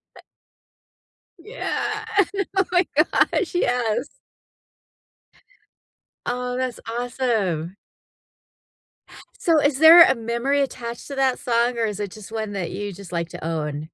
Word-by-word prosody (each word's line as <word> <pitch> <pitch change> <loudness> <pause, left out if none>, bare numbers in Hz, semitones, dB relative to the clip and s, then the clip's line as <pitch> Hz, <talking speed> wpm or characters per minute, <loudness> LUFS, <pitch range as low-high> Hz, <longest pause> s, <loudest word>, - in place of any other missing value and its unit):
Uh - - -14 1.2
Yeah. 430 +1 -4 0.5
Oh 380 -1 +3
my 355 -1 +3
gosh, 325 +4 +2
yes. 245 -5 -1 2.1
Oh, 250 0 -3
that's 255 -1 -3 0.2
awesome. 210 -9 -2 1.6
So, 325 -3 +3
is 285 -1 +1
there 330 +2 +10
a 265 - +3
memory 235 +5 -1
attached 235 -3 -5
to 280 - -6
that 265 -2 +1
song, 240 -1 0
or 230 - +1
is 210 -2 -4
it 200 -3 -4
just 215 0 -12
one 220 -2 -4
that 190 -4 -4
you 205 -1 -5
just 190 -1 -12
like 170 -1 -3
to - - -9
own? 150 -2 -3
240 Hz, 125 wpm, -22 LUFS, 205-275 Hz, 2.1 s, there